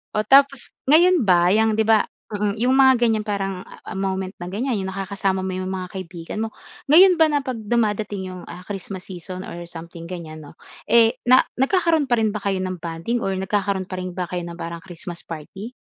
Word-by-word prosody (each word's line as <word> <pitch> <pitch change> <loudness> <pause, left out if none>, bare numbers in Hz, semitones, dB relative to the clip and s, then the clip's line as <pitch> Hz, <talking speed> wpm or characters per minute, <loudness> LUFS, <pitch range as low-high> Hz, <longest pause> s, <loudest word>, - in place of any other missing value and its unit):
O 210 - +3
tapos 275 0 +4 0.2
ngayon 345 0 +6
ba 175 -3 +4
yang 220 0 +3
'di 220 0 +1
ba, 220 -2 +5 0.3
mm, 205 0 -1
yung 250 +3 +3
mga 265 -2 +6
ganyan 225 -3 +2
parang 195 -3 -3 0.3
moment 190 -1 -2
na 175 - -6
ganyan 240 +5 -1
yung 190 -2 -3
nakakasama 195 0 -2
mo 190 0 -3
yung 185 0 -3
mga 185 -1 -4
kaibigan 180 +2 -6
mo. 225 - -4 0.4
Ngayon 365 +4 +8
ba 320 -2 +4
na 290 - +2
'pag 260 -2 -4
dumadating 210 -3 -1
yung, 185 -1 -8
ah, 175 - -9
Christmas 195 -2 -7
season 185 0 -7
or 175 0 -7
something 170 0 -9
ganyan 160 -3 -7
no, 145 - -15 0.3
eh 235 0 +6
na 255 +1 +5
nagkakaroon 315 0 +2
pa 240 - +4
rin 215 -1 0
ba 210 - -4
kayo 195 -1 0
ng 185 -2 -4
bonding 170 +9 -2
or 195 - 0
nagkakaroon 190 -1 -1
pa 185 - -5
rin 185 - -5
ba 180 0 -4
kayo 180 0 -4
ng 170 0 -8
parang 170 -1 -6
Christmas 175 -1 -8
party? 180 +8 -8
195 Hz, 205 wpm, -22 LUFS, 180-235 Hz, 0.4 s, Ngayon